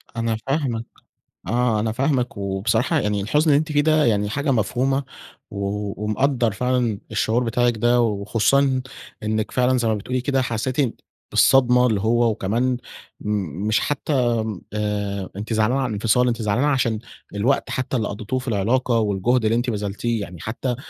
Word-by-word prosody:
أنا 115 -1 -1
فاهمِك 135 -5 -1 0.6
آه. 120 -2 +1
أنا 110 +1 0
فاهمِك 125 -1 0
وبصراحة 110 - 0
يعني 105 -4 -1
الحُزن 150 +10 +2
اللي 140 - +5
أنتِ 155 0 -3
فيه 145 -1 +3
ده 155 0 +3
يعني 105 -2 +1
حاجة 140 +5 -1
مفهومة. 130 +4 +1 0.5
و 100 0 -3
ومقدّر 120 +2 +1
فعلًا 120 -1 0
الشعور 110 +3 +1
بتاعِك 120 0 +1
ده، 120 +2 +3
وخصوصًا 120 +5 +2 0.4
إنِّك 110 0 -1
فعلًا 125 0 +2
زي 120 -2 0
ما 110 - +2
بتقولي 125 +5 -3
كده، 135 +1 +1
حسّيتِ 125 +2 -1 0.3
بالصدمة 125 -2 +5
اللي 105 -4 0
هو 120 +2 +3
وكمان 115 +5 0 0.4
م 100 -3 -3
مش 110 - +3
حتّى 125 -5 0
م 105 -5 -5
آآ 105 -2 -2
أنتِ 105 +3 -4
زعلانة 110 +5 +2
على 130 - 0
الإنفصال، 115 +4 +2
أنتِ 115 -1 -1
زعلانة 110 +7 +1
عشان 125 -6 +1 0.4
الوقت 120 +7 +1
حتّى 130 0 -2
اللي 110 -3 -1
قضّيتوه 110 +5 -3
في 130 - -10
العلاقة 115 +3 +1
والجهد 110 +4 +1
اللي 110 +1 +2
أنتِ 120 +2 0
بذلتيه 105 +1 -2
يعني. 90 -3 -8
حتّى 120 +4 -4
أ - - -2
115 Hz, 165 wpm, -22 LUFS, 105-130 Hz, 0.6 s, اللي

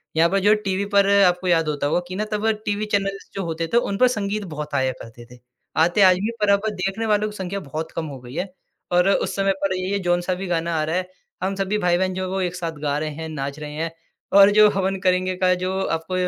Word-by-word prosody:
यहाँ 165 +1 +4
पर 195 - +1
जो 205 +2 +3
है 215 - +6
टीवी 200 -1 -2
पर 200 0 +5
आपको 180 0 +2
याद 165 -2 +3
होता 145 -1 -1
होगा 155 - +1
कि 185 - -6
ना 215 +2 -1
तब 210 +1 -1 0.2
टीवी 205 +1 -1
चैनल्स 195 0 -1
जो 195 - -3
होते 165 0 -3
थे - - +5
उन 200 -4 0
पर 255 - +5
संगीत 210 -3 -2
बहुत 150 0 -6
आया 130 -1 +1
करते 115 +1 -12
थे। 125 - -14 0.4
आते 175 +5 +3
आज 185 -1 +7
भी 200 - -2
हैं, 230 - -3
पर 210 - +3
अब 200 +2 +3
देखने 195 +4 -2
वालों 210 0 +1
की 210 - -11
संख्या 190 +1 -4
बहुत 155 0 -6
कम 165 - -2
हो 135 -2 -8
गई 125 0 -12
है 185 +2 -4 0.4
और 180 +2 +4
उस - - 0
समय 195 0 +2
पर 190 -1 +1
ये 185 +2 -1
जौन-सा 175 0 0
भी 190 +1 -5
गाना 170 -1 -1
आ - - +1
रहा 160 +2 -2
है 185 0 -2 0.3
हम 195 +1 -1
सभी 195 +2 -1
भाई 175 -3 +2
बहन 185 0 0
जो 185 +1 -3
एक 180 0 -2
साथ 170 -2 -3
गा 145 -1 0
रहे 155 0 -2
हैं, 160 +2 -6
नाच 140 -1 -5
रहे 150 -1 -6
हैं 160 +2 -3 0.5
और 200 0 +9
जो 210 0 +6
हवन 195 -1 -1
करेंगे 185 -1 +1
का 185 0 +3
जो 185 - -1
आपको 165 0 -3
185 Hz, 260 wpm, -22 LUFS, 165-200 Hz, 0.5 s, और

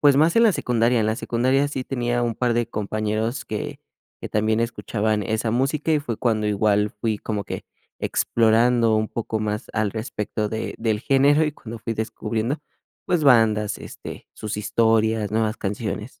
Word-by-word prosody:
pues, 145 -2 +5
más 160 +6 +4
en 230 - +6
la 220 - +5
secundaria. 120 -4 +2
En 110 - +1
la 110 - 0
secundaria 130 +4 +1
sí 135 -2 -3
tenía 120 -2 -1
un 120 -2 0
par 120 -2 +1
de 120 -1 0
compañeros 110 +3 -2
que - - -5 0.4
que - - -6
también 110 +1 +1
escuchaban 110 -2 -1
esa 110 0 -1
música, 135 +6 0
y 150 - +4
fue 120 -6 -4
cuando 110 -3 0
igual 105 0 +2
fui 105 0 -2
como 105 -2 -3
que - - -6 0.4
explorando 115 0 +3
un 110 0 0
poco 110 -1 -3
más 105 +2 -2
al 110 -2 +1
respecto 110 -2 -3
de 110 +1 -4
del 110 -2 0
género, 140 +4 +4
y 150 - 0
cuando 115 -5 -9
fui 115 +1 -3
descubriendo, 110 +4 -2 0.5
pues, 170 -4 +1
bandas, 110 -5 +4
este, - - -9
sus 105 -1 -5
historias, 110 0 +2
nuevas 110 0 +1
canciones. 105 +3 -4
115 Hz, 175 wpm, -23 LUFS, 110-120 Hz, 0.5 s, en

